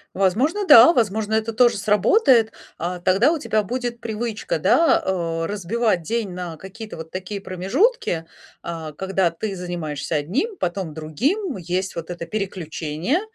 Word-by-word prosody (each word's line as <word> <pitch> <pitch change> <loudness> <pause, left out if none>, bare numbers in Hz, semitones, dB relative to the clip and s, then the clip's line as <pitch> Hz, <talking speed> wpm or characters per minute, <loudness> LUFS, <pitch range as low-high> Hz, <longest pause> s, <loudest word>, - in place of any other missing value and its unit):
Возможно, 255 - +1
да, 285 +2 +9
возможно 220 - 0
это 220 +1 0
тоже 240 0 +4
сработает, 220 - +4 0.3
а, 180 +2 -3
тогда 190 - +3
у 330 - -1
тебя 215 -7 0
будет 240 +2 -4
привычка, 230 - -3
да, 330 - +4
э, 165 -3 -1
разбивать 205 0 0
день 225 +4 -2
на 175 -2 -5
какие-то 210 +4 -9
вот 160 0 -8
такие 185 +3 -5
промежутки, 195 - 0 0.4
а, 165 -2 -6
когда 190 +1 0
ты 195 +4 -4
занимаешься 170 -4 -4
одним, 220 - -1
потом 175 - -3
другим, 255 - -2
есть 185 +2 -3
вот 170 +1 -5
это 170 -1 -6
переключение, 180 - -2
195 Hz, 145 wpm, -22 LUFS, 175-235 Hz, 0.4 s, да